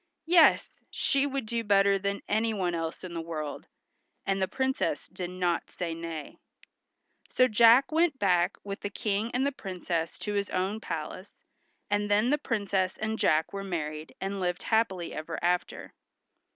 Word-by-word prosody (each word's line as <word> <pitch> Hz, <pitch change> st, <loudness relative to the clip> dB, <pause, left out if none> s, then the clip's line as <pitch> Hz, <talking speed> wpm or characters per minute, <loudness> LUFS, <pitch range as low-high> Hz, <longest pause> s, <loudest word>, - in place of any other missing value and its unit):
"Yes, 335 Hz, -1 st, +5 dB, 0.2 s
she 275 Hz, +1 st, +1 dB
would 275 Hz, -3 st, -3 dB
do 230 Hz, +1 st, -2 dB
better 200 Hz, -1 st, +4 dB
than 200 Hz, +1 st, -2 dB
anyone 210 Hz, -4 st, 0 dB
else 165 Hz, -1 st, -4 dB
in 180 Hz, -2 st, -7 dB
the 165 Hz, -, -3 dB
world." 155 Hz, -3 st, -5 dB, 0.6 s
And 195 Hz, 0 st, 0 dB
the 190 Hz, -, +2 dB
Princess 265 Hz, +4 st, -1 dB
did 180 Hz, -2 st, -4 dB
not 180 Hz, -2 st, -1 dB
say 170 Hz, -2 st, -4 dB
nay. 165 Hz, -2 st, -7 dB, 0.9 s
So 255 Hz, -, +4 dB
Jack 235 Hz, +5 st, +6 dB
went 320 Hz, -2 st, +2 dB
back 180 Hz, -5 st, +2 dB
with 200 Hz, -1 st, -5 dB
the 205 Hz, -, -4 dB
King 210 Hz, +1 st, -1 dB
and 255 Hz, +2 st, +1 dB
the 280 Hz, -, +1 dB
Princess 180 Hz, -, -3 dB
to 210 Hz, -, -4 dB
his 200 Hz, 0 st, -1 dB
own 190 Hz, +4 st, -1 dB
palace, 165 Hz, +1 st, -6 dB, 0.5 s
and 205 Hz, 0 st, 0 dB
then 210 Hz, +5 st, +3 dB
the 295 Hz, -, +2 dB
Princess 200 Hz, -7 st, -1 dB
and 220 Hz, 0 st, -2 dB
Jack 155 Hz, +3 st, +2 dB
were 195 Hz, 0 st, -4 dB
married, 155 Hz, -4 st, -4 dB
and 195 Hz, +1 st, -3 dB
lived 180 Hz, -1 st, -2 dB
happily 210 Hz, -6 st, 0 dB
ever 160 Hz, +1 st, -5 dB
after. 175 Hz, +1 st, -1 dB
195 Hz, 165 wpm, -29 LUFS, 175-220 Hz, 0.9 s, Jack